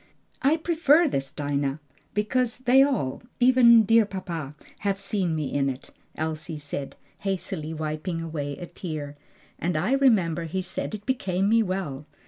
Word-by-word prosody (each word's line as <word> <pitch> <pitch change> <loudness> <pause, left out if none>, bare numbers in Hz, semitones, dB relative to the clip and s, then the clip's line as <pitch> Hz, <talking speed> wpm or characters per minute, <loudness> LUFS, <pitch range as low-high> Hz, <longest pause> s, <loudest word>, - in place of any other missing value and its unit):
"I 290 +4 +3
prefer 325 -1 +4
this, 135 - -2
Dinah, 140 0 -2 0.4
because 225 +3 0
they 255 +1 +5
all 250 - +1 0.2
even 245 -2 +7
dear, 225 +2 +5
dear - - -4
papa 170 -7 -5 0.2
have 200 -1 -1
seen 195 -4 -1
me 150 -3 -3
in 140 -1 +1
it," 130 0 -7 0.2
Elsie 155 0 -3
said, 145 -1 -6 0.2
hastily 190 -5 -3
wiping 155 +2 -3
away 150 -4 -4
a 175 - -6
tear; 155 -5 -6 0.4
"and 170 -2 -1
I 185 +10 0
remember 195 - +3
he 185 +4 -3
said 215 - -4
it 210 -1 -10
became 195 -7 0
me 225 +2 +4
well. 180 -8 -3
180 Hz, 155 wpm, -26 LUFS, 155-225 Hz, 0.4 s, even